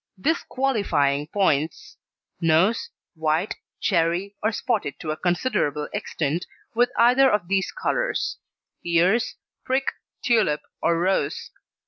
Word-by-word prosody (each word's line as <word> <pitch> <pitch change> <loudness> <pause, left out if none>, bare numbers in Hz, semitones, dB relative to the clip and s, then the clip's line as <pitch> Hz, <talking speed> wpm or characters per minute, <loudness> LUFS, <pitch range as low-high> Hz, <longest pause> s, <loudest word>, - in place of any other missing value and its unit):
DISQUALIFYING 200 - +1
POINTS: 160 -5 0 0.5
NOSE 170 +7 +3 0.2
White, 160 +3 0 0.2
cherry, 175 +2 +1
or 220 - +1
spotted 210 - -2
to 155 - -3
a - - -1
considerable 165 - 0
extent 170 -5 -2 0.3
with 240 +1 +3
either 250 +3 +6
of 210 -6 0
these 195 +1 +1
colours. - - -1 0.4
EARS 175 +7 +2 0.3
prick, 265 +1 0 0.3
tulip, 220 - +2 0.2
or 170 - +2
rose. 175 -4 0
185 Hz, 105 wpm, -24 LUFS, 160-235 Hz, 0.5 s, either